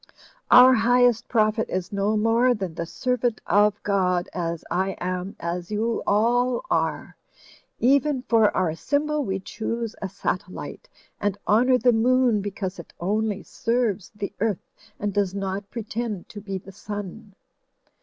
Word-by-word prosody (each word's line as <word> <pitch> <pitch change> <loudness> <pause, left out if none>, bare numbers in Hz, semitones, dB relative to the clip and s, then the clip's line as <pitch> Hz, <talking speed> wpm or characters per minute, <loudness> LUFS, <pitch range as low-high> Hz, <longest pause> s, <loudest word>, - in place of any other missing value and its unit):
Our 250 +1 +9
highest 245 0 +3
prophet 220 -1 +1
is 185 +1 -3
no 200 +2 +1
more 230 +3 +3
than 190 -5 -4
the 170 +1 -4
servant 245 +1 -1
of 205 0 +3
God, 185 -3 +1
as 170 -2 -3
I 190 +2 0
am, 185 +1 -3
as 170 +1 -4
you 220 +2 -1
all 240 +4 +2
are. - - -1 0.6
Even 270 +1 +2
for 225 -4 +4
our 185 -4 +2
s)rmbol 290 - -1
we 195 -5 -2
choose 230 +3 -4
a 195 - -3
satellite, 185 +1 -5 0.3
and 205 -1 -1
honour 250 +5 +4
the 245 -1 +3
Moon 240 -1 +3
because 195 -2 -5
it 170 - -11
only 205 +2 -1
serves 230 -5 -1
the 205 -1 -5
Earth, 210 -3 -2 0.3
and 205 -1 -2
does 200 -1 0
not 195 0 -3
pretend 225 -3 -4
to 205 - -9
be 195 -1 -4
the 190 +1 -11
Sun." 205 +1 -8
210 Hz, 145 wpm, -24 LUFS, 190-235 Hz, 0.6 s, Our